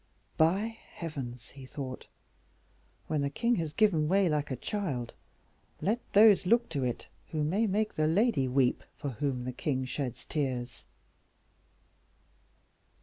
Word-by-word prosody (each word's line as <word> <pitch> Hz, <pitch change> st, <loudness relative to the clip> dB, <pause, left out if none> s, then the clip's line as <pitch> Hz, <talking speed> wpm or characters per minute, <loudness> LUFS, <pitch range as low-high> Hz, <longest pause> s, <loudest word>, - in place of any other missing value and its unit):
"By 200 Hz, +8 st, +2 dB, 0.2 s
heavens!" 130 Hz, -7 st, -6 dB
he 135 Hz, -1 st, -11 dB
thought, 130 Hz, -2 st, -6 dB, 1.0 s
"when 155 Hz, -2 st, -1 dB
the 140 Hz, -, 0 dB
king 235 Hz, -, +1 dB
has 160 Hz, -3 st, -2 dB
given 170 Hz, -6 st, +3 dB
way 195 Hz, +2 st, +4 dB
like 150 Hz, -2 st, 0 dB
a 130 Hz, -, -2 dB
child, 135 Hz, -, -3 dB, 0.7 s
let 220 Hz, +5 st, +1 dB
those 205 Hz, -3 st, +7 dB
look 235 Hz, +4 st, +3 dB
to 145 Hz, -5 st, -2 dB
it 125 Hz, -2 st, -2 dB, 0.2 s
who 155 Hz, -2 st, -2 dB
may 195 Hz, +9 st, +1 dB
make 210 Hz, +2 st, 0 dB
the 155 Hz, 0 st, +1 dB
lady 175 Hz, -, +2 dB
weep 130 Hz, -1 st, +2 dB
for 140 Hz, -, -3 dB
whom 130 Hz, +1 st, -2 dB
the 125 Hz, 0 st, -4 dB
king 130 Hz, 0 st, -1 dB
sheds 130 Hz, -2 st, -4 dB
tears." 130 Hz, -5 st, -3 dB
150 Hz, 140 wpm, -30 LUFS, 130-195 Hz, 1.0 s, those